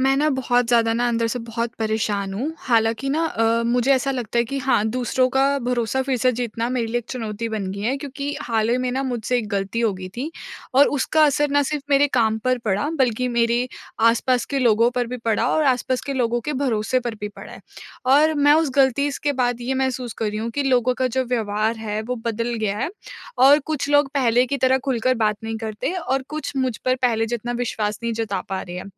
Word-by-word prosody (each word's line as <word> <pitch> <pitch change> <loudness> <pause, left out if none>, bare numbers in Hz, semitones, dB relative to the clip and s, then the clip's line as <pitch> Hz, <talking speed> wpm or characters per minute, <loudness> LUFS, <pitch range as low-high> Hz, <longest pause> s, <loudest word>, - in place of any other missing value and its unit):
मैं 270 +1 +3
ना 300 +2 +2
बहुत 245 -2 +1
ज़्यादा 230 -2 +3
ना 240 +1 +1
अंदर 230 -1 0
से 250 - -2
बहुत 230 0 -4
परेशान 210 -3 -1
हूँ। 270 +10 -3
हालाँकि 225 +1 +1
ना 315 +4 +1
अ, 230 -4 +1
मुझे 245 +3 +2
ऐसा 270 +1 +1
लगता 240 -3 -2
है 235 - +3
कि 275 +4 -4
हाँ, 260 -5 +1
दूसरों 255 +2 +1
का 265 +1 +2 0.2
भरोसा 250 0 -1
फिर 265 -1 -1
से 255 +2 +3
जीतना 235 -1 -3
मेरे 250 -2 -1
लिए 235 +2 -1
एक 240 - -8
चुनौती 225 -2 -4
बन 205 -4 -3
गया 210 +7 -1
क्योंकि 280 +1 -5
हाल 225 -1 0
ही 240 - +3
में 250 - 0
ना 265 +2 -1
मुझसे 250 -1 -1
एक 220 -3 -4
गलती 200 +2 -2
होगी 190 -5 -1
थी। 275 +6 -3 0.4
और 280 +2 +7
उसका 310 +3 +3
असर 295 0 +1
ना 285 0 +3
सिर्फ़ 290 0 -3
मेरे 280 +1 +5
काम 220 -3 +2
पर 255 0 +2
पड़ा 210 +7 0
बल्कि 250 -1 +1
मेरे 235 +1 +1 0.3
आस-पास 235 +2 +3
के - - +2
लोगों 235 -2 +4
पर 245 -1 -1
भी 250 +2 -5
पड़ा 225 -2 +1
और 310 - +2
आस-पास 255 -1 +1
के 280 - -2
लोगों 240 -2 0
के - - 0
भरोसे 255 0 +1
पर 240 -2 -4
भी 210 - -3
पड़ा 205 - -12
है। - - -11 0.5
और 295 +4 +5
मैं 290 0 +5
उस 315 -2 +2
गलती 275 +1 +3
स - - -5
के 290 - +2
बाद 245 -2 0
ये 250 +2 -2
महसूस 260 -2 -2
कर 220 - -1
रही 210 - -4
हूँ 225 +2 -3
कि 285 +5 -1
लोगों 255 -2 +2
का 260 - +2
जो 260 +1 -1
व्यवहार 220 -2 -1
है 215 -1 -3
वो 250 +3 -3
बदल 230 +1 -1
गया 210 -2 -2
है 265 +8 -2 0.5
और 275 +3 +7
कुछ 295 -3 -2
लोग 290 -1 +4
पहले 245 -3 +3
की 280 - -1
तरह 260 0 +3
खुलकर 255 -1 +1
बात 210 -1 +1
नहीं 225 0 -3
करते 220 +7 -3
और 270 -7 -1
कुछ 310 +1 -5
मुझ 260 -4 0
पर 255 - +3
पहले 225 -2 +2
जितना 240 +1 -3
विश्वास 215 -3 -2
नहीं 235 0 -1
जता 215 -4 -2
पा 190 -1 -2
रहे 175 -1 -8
हैं। - - -7
245 Hz, 230 wpm, -22 LUFS, 225-265 Hz, 0.5 s, और